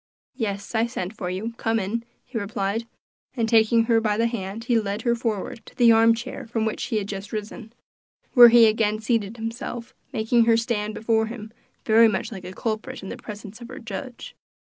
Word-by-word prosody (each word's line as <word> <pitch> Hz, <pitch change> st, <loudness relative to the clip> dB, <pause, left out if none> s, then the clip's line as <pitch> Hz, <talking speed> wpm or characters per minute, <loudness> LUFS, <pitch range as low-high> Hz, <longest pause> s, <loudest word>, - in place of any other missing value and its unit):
"Yes, 205 Hz, -5 st, -4 dB
I 225 Hz, +1 st, +2 dB
sent 215 Hz, -4 st, -5 dB
for 180 Hz, -4 st, -4 dB
you; 205 Hz, +6 st, -4 dB
come 225 Hz, 0 st, 0 dB
in," 215 Hz, +4 st, -2 dB, 0.2 s
he 245 Hz, -2 st, -4 dB
replied; 205 Hz, +2 st, -2 dB, 0.5 s
and 230 Hz, -3 st, 0 dB
taking 225 Hz, 0 st, +4 dB
her 225 Hz, -1 st, +3 dB
by 210 Hz, -2 st, 0 dB
the 230 Hz, -, +2 dB
hand 225 Hz, -2 st, -4 dB
he 235 Hz, -1 st, +2 dB
led 205 Hz, +1 st, -3 dB
her 235 Hz, -, +2 dB
forward 230 Hz, -1 st, -3 dB
to -, -, -14 dB
the 235 Hz, -2 st, +6 dB
arm 225 Hz, 0 st, +5 dB
chair 240 Hz, 0 st, -7 dB
from 225 Hz, -1 st, -1 dB
which 220 Hz, -, -2 dB
he 235 Hz, -, -3 dB
had 205 Hz, -2 st, -2 dB
just 200 Hz, 0 st, -6 dB
risen, 215 Hz, +1 st, -6 dB, 0.6 s
where 240 Hz, -3 st, +10 dB
he 235 Hz, 0 st, +7 dB
again 215 Hz, -1 st, +2 dB
seated 220 Hz, -1 st, -1 dB
himself, 235 Hz, +1 st, -6 dB, 0.2 s
making 230 Hz, -1 st, +2 dB
her 230 Hz, -1 st, +4 dB
stand 215 Hz, -2 st, -2 dB
before 220 Hz, 0 st, +1 dB
him 220 Hz, -1 st, -8 dB, 0.3 s
very 225 Hz, +1 st, +6 dB
much 215 Hz, +2 st, -2 dB
like 190 Hz, -4 st, -8 dB
a 180 Hz, -, -6 dB
culprit 220 Hz, +5 st, -4 dB
in 190 Hz, -, -6 dB
the -, -, -5 dB
presence 210 Hz, +1 st, -10 dB
of 235 Hz, -, -8 dB
her 255 Hz, +1 st, -9 dB
judge. 235 Hz, +3 st, -7 dB
225 Hz, 205 wpm, -24 LUFS, 210-235 Hz, 0.6 s, where